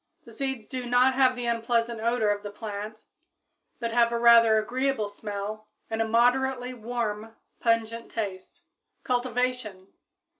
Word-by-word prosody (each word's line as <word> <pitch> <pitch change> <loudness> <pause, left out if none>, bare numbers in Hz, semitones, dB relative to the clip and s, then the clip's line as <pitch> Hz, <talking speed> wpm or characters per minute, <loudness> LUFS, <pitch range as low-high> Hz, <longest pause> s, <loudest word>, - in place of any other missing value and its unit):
The - - -13
seeds 265 -5 -4
do 255 0 -5
not 250 +2 +4
have 260 -1 +3
the 245 -1 -4
unpleasant 230 0 0
odor 230 -2 +2
of 205 0 -2
the 205 - -6
plant, 210 +1 -7 0.7
but 235 -2 -2
have 235 0 +4
a 235 - 0
rather 230 -2 +6
agreeable 250 +1 0
smell 210 +1 -6 0.2
and 225 0 -1
a 225 - 0
moderately 250 +2 +2
warm, 225 -2 -4 0.2
pungent 230 0 0
taste. 205 - -6 0.4
_Cultivation. 250 -5 -2
230 Hz, 140 wpm, -27 LUFS, 215-250 Hz, 0.7 s, rather